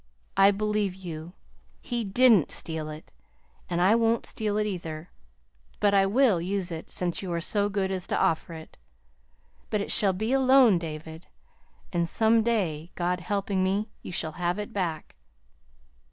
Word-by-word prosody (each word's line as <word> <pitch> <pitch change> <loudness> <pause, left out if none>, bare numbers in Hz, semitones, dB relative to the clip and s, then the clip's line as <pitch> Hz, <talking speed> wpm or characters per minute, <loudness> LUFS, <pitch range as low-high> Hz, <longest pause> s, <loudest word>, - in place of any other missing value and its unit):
I 195 +1 +6
believe 210 -1 0
you. 170 -2 -8 0.5
He 240 -2 -3
didn't 215 - +4
steal 160 -2 -5
it, 155 0 -10 0.6
and 175 -1 -1
I 185 +4 +5
won't 230 0 +2
steal 210 -1 -2
it, 215 - +1
either. 170 -4 -5 0.7
But 205 -1 +3
I 195 -1 +4
will 220 -4 +3
use 185 0 -2
it, 160 -1 -6
since 175 -2 -2
you 185 -3 -5
are 170 - -1
so 205 +4 0
good 195 -1 -1
as 185 -2 -3
to - - -1
offer 170 -2 0
it. 160 0 -12 0.9
But 210 - 0
it 200 - -2
shall 195 -2 +3
be 220 +7 -1
a 270 - +4
loan, 260 -7 +6
David, 160 0 -8 0.7
and 170 -1 0
some 225 +3 +3
day, 180 -9 -1
God 180 +1 -1
helping 195 +1 -1
me, 200 +4 -1
you - - -8
shall 160 -2 -2
have 175 +2 0
it 210 -1 -6
back. 170 -5 -3
190 Hz, 165 wpm, -27 LUFS, 170-210 Hz, 0.9 s, I